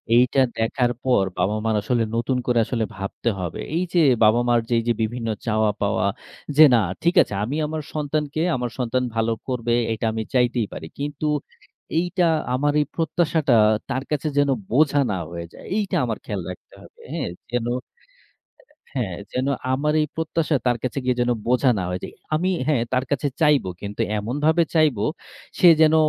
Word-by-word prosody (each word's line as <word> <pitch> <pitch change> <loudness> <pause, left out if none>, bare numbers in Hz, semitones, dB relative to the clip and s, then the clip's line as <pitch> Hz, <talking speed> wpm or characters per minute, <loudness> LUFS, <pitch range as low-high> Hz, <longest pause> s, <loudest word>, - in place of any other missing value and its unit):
এইটা 125 +3 +4 0.2
দেখার 120 +2 +1
পর 125 -7 +3
বাবা-মার 110 +2 0
আসলে 120 +2 +1
নতুন 125 +2 0
করে 120 -1 +3
আসলে 115 -2 -1
ভাবতে 100 +4 -3
হবে। 90 -3 -4 0.2
এই 175 - +1
যে 175 - +4 0.2
বাবা-মার 120 +2 +4
যেই 120 -1 +2
যে 120 - +3
বিভিন্ন 115 +1 -2 0.2
চাওয়া 110 -2 +2
পাওয়া, 100 0 +1 0.5
যে 155 - +10
না 120 - +6 0.2
ঠিক 170 +2 +2
আছে - - -2
আমি 125 +7 -2
আমার 155 0 -3
সন্তানকে, 150 0 -2
আমার 125 -1 -2
সন্তান 125 +1 0
ভালো 115 0 +1 0.2
করবে, 120 -2 -1 0.2
এটা 110 - -3
আমি 110 0 -2
চাইতেই 125 -3 +2
পারি। 80 - -7
কিন্তু 145 +1 -3 0.7
এইটা 180 +1 +1 0.3
আমার 145 +3 +1
এই 150 - 0
প্রত্যাশাটা 160 -3 +1 0.4
তার 130 0 -1
কাছে 150 +1 -1
যেন 145 -1 +3 0.2
বোঝা 145 +3 +3
না 95 - -1
হয়ে 85 0 -5
যায়। - - -13
এইটা 205 -3 -1
আমার 115 -3 -2
খেয়াল 100 -3 -3
রাখতে 90 - -10
হবে। - - -17
হ্যাঁ? - - -2 0.2
যেন 120 -1 0 1.3
হ্যাঁ, 110 -10 -2 0.2
যেন 130 +1 -1 0.3
আমার 150 +3 +1
এই 150 - +1
প্রত্যাশা 160 -1 0
তার 120 -1 +2
কাছে 130 +2 -2
গিয়ে 125 -1 +1
যেন 120 0 +2 0.2
বোঝা 125 +2 +3
না - - -1
হয়ে 90 0 -3
যাই। - - -7 0.2
আমি 175 +4 +1 0.2
হ্যাঁ, 145 -6 +2
তার 130 0 +1
কাছে 145 0 0
চাইবো 150 -10 +3
কিন্তু 100 0 -6 0.2
এমনভাবে 150 +10 +1
চাইবো, 150 -10 +3 0.5
সে 180 - +7
যেন 160 0 +6
125 Hz, 175 wpm, -23 LUFS, 115-150 Hz, 1.3 s, যে